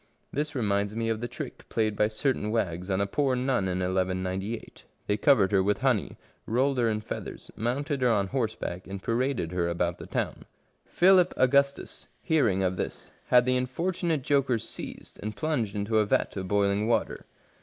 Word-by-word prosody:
This 150 +1 -2
reminds 100 -3 0
me 115 0 -1
of 110 0 -1
the 120 - -2
trick 120 - -8
played 110 -2 0
by 105 - +3
certain 110 -1 -1
wags 90 -5 -1
on 95 0 +1
a - - +2
poor 130 +5 +1
nun 125 -6 0
in 90 0 -1
rigS. 95 +3 -2 0.2
They 105 - +1
covered 105 -4 +4
her 100 -2 +4
with 100 +2 +1
honey, 130 -6 +1 0.3
rolled 130 +3 +1
her 115 -2 +3
in 105 -1 -1
feathers, - - -7
mounted 135 +5 -2
her 125 - +4
on 105 -4 +2
horseback, 110 -8 -3
and 95 0 -7
paraded 120 -7 0
her 90 -1 0
about 85 0 -1
the - - -8
town. - - -3 0.4
Philip 185 0 +5
Augustus, 140 +2 +2 0.2
hearing 115 - +2
of 90 0 0
this, - - -4 0.2
had 125 -1 +5
the 130 0 +2
unfortunate 165 +4 -1
jokers 135 -5 +1
seized - - -7
and 105 +1 -4
plunged 140 -11 -1
into 105 +2 +1
a 105 - +3
vat - - +1
of 95 -2 -4
boiling 100 +2 +2
water. 115 - 0
110 Hz, 180 wpm, -28 LUFS, 100-130 Hz, 0.4 s, Philip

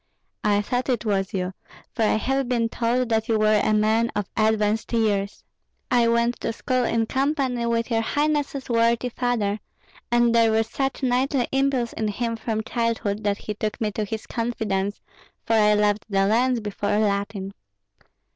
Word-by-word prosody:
"I 205 -1 +2
thought 250 +5 -2
it 240 -2 0
was 195 -2 0
you, 185 -1 -2 0.4
for 230 - -4
I 215 - +3
have 270 +3 -1
been 230 -2 +1
told 240 +2 0
that 225 +1 0
you 225 - +3
were 215 -1 +3
a - - +2
man 220 +2 +2
of 205 -2 -1
advanced 215 0 +1
years." 205 -3 0 0.5
"I 240 -1 +4
went 235 +1 +1
to - - -2
school 255 +2 -1
in 225 -1 +1
company 265 -2 0
with 230 +1 -1
your 225 -1 +2
highness's 290 +1 -1
worthy 235 +1 +2
father; 230 -4 -1 0.5
and 240 -1 +4
there 230 -1 +4
was 220 0 +1
such 270 0 -2
knightly 255 +1 +1
impulse 270 -3 +1
in 220 - -2
him 230 +2 -2
from 220 -1 -3
childhood 225 -3 -1
that 200 -1 +1
he 210 - -5
took 215 0 -4
me 215 -2 -1
to 215 - -2
his 220 +1 -5
confidence, 210 -4 -2 0.5
for 225 - 0
I 210 -1 +5
loved 210 0 +1
the 195 -1 +2
lance 240 +4 +2
before 205 0 -1
Latin." 200 -1 -1
225 Hz, 175 wpm, -24 LUFS, 210-245 Hz, 0.5 s, I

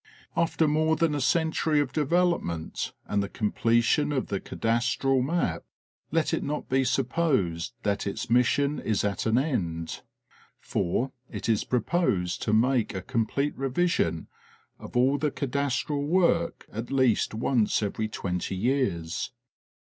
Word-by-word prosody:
After 165 -1 +2
more 155 +1 +2
than 165 -1 +1
a 145 - -1
century 160 +1 +2
of 145 -3 -1
development 155 - 0
and 100 - 0
the 100 - -3
completion 115 +7 +1
of 135 -3 -1
the 100 - -1
cadastral 125 +5 0
map, 165 +7 -1 0.5
let 165 0 +1
it - - +1
not 150 +1 -3
be 135 +1 +2
supposed 125 - 0
that 100 0 0
its 100 - -3
mission 135 +5 +2
is 110 -2 0
at 100 +2 -1
an 110 +1 +3
end, 85 - -2 0.6
for 125 +10 -1 0.2
it - - -5
is 110 -3 +2
proposed 120 - 0
to 105 - -1
make 120 0 +2
a 95 - -4
complete 135 +4 -1
revision 135 - 0 0.5
of - - -6
all 135 +3 +3
the 150 +1 +1
cadastral 140 +1 -1
work 170 -1 +2
at 115 +3 -5
least 130 -5 +2
once 110 -2 +1
every 110 +2 -2
twenty 95 -3 -3
years. 95 -7 -1
130 Hz, 140 wpm, -27 LUFS, 105-150 Hz, 0.6 s, an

